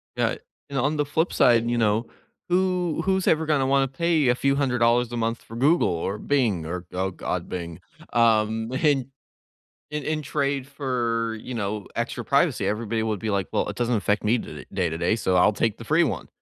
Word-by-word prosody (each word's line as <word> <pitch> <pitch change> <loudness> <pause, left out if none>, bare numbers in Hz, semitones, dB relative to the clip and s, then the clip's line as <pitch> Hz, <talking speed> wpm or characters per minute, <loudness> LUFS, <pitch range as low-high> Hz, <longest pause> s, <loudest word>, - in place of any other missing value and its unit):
Yeah, - - +1 0.3
and 140 - -4
on 145 +4 +1
the 145 - +1
flip 160 +4 0
side, 120 -1 +4
you 120 - 0
know, 110 0 +2 0.4
who 180 -2 +1
who's 190 -1 +1
ever 160 0 +3
gonna 150 -3 +2
wanna 135 0 +3
pay 155 +1 +1
a 125 - +4
few 140 +1 +1
hundred 135 -3 0
dollars 120 +1 +3
a 120 - -3
month 115 0 -1
for 115 - -11
Google 145 +8 +3
or 90 +4 -2
Bing 110 - 0
or 90 +2 -5
oh, 95 +1 -1
god, - - -4
Bing, 85 -2 -5 0.3
um, 110 0 +2
in 135 -2 +1 0.8
in 150 0 -3
in 155 0 -1
trade 140 -1 -1
for, 120 -5 -2
you 125 - -7
know, 105 -2 -3
extra - - -3
privacy, - - +2
everybody 110 +1 -1
would 110 -2 -1
be 110 - -2
like, 100 -2 -1
"Well, - - 0
it - - -5
doesn't 120 -1 +1
affect 105 +1 0
me 115 +4 +3
tod - - -8
day 95 -3 0
to 80 - -4
day, 85 +6 +1
so 95 -5 +1
I'll 90 - +5
take 110 +1 -1
the 115 - -9
free 160 +6 +3
one." 150 - -3
120 Hz, 210 wpm, -24 LUFS, 110-140 Hz, 0.8 s, I'll